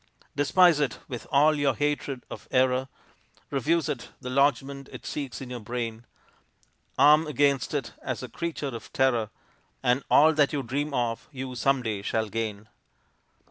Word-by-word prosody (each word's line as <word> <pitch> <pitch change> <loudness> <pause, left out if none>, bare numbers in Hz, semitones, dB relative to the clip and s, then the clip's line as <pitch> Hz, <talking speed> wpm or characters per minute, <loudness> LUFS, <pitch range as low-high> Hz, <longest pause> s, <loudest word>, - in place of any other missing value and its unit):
Despise 160 +3 +5
it 140 -6 0
with 120 -3 -7
all 145 +2 +5
of 150 - -3
your 140 -3 +2
hatred 145 -1 -2
of - - -10
error; 130 0 +2 0.6
Refuse 150 +3 +1
it 120 -3 -4
the 125 - -6
lodgment 140 0 +1
it - - -10
seeks 140 -4 -5
in 130 -1 -7
your 125 - -4
brain; 115 0 -5 0.9
Arm 150 +3 +6
against 140 -1 +1
it 135 -4 -3
as 130 -1 -4
a - - -5
creature 150 +3 -4
of 115 -3 -8
terror, 120 -5 +2 0.5
And 125 +2 +2
all 155 +2 +6
that 150 -2 +2
you 140 -2 -1
dream 145 +5 -2
of 120 -2 -2
you 130 -2 -6
some 130 +1 +1
day 110 -4 -2
shall 110 +1 -1
gain. 110 -1 -4
130 Hz, 165 wpm, -27 LUFS, 120-145 Hz, 0.9 s, Arm